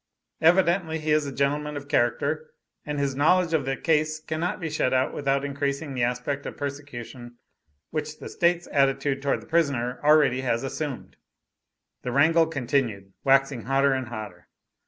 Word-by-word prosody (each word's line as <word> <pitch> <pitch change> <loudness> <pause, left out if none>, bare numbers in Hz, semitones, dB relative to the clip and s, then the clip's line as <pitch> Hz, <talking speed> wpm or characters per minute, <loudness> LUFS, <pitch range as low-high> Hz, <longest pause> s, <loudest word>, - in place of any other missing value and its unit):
Evidently 170 -1 +3
he 155 -1 -2
is 150 -1 +2
a - - -4
gentleman 145 +2 -1
of 140 0 -8
character, 145 +5 0 0.4
and 150 0 -2
his 140 -1 0
knowledge 165 +4 +3
of 150 -4 +1
the 135 0 -1
case 155 -1 +1
cannot 160 +5 -3
be 165 - -3
shut 150 -4 0
out 130 - +1
without 140 0 0
increasing 140 +1 -2
the 125 - -2
aspect 125 +4 -1
of - - -7
persecution 130 -4 -7 0.5
which 155 -1 -4
the - - -9
State's 175 0 +1
attitude 135 0 +1
towards 140 0 0
the - - -17
prisoner 140 -7 0
already 145 -4 +4
has 120 -1 -1
assumed." 140 0 -5 0.8
The 125 - -4
wrangle 160 +5 +4
continued, 125 -9 -1
waxing 135 -2 +2
hotter 135 +1 +3
and 130 -1 -2
hotter. 110 -7 -8
140 Hz, 160 wpm, -25 LUFS, 130-155 Hz, 0.8 s, already